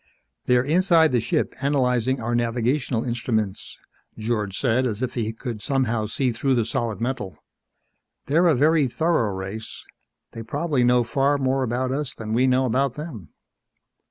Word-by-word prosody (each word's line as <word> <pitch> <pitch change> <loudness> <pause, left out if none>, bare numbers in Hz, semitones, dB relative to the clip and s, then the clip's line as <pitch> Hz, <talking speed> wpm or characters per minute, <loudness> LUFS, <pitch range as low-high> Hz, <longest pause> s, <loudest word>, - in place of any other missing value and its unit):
"They're 125 0 +3
inside 165 +1 +4
the 125 - +2
ship 115 +2 -1
analyzing 130 -2 +1
our 120 +1 -2
navigational 120 +1 0
instruments," 115 -5 -2 0.4
George 110 -3 -2
said 130 0 +1
as 110 +1 -3
if 125 - -2
he 110 -3 -2
could 115 -1 -6
somehow 120 -6 0
see 125 +3 0
through 130 +3 0
the 115 -3 +1
solid 115 -1 -2
metal. 120 -6 -3 0.9
"They're 165 +5 +3
a 160 - +4
very 150 +2 +3
thorough 155 -5 +1
race. 95 +3 -7 0.5
They 115 - -7
probably 145 +3 -1
know 125 0 +4
far 135 +5 +1
more 135 0 0
about 130 +1 -1
us 140 0 -3
than 110 -1 -5
we 125 +3 +3
know 130 +1 +3
about 130 +1 0
them." 140 - -8
125 Hz, 155 wpm, -23 LUFS, 115-135 Hz, 0.9 s, inside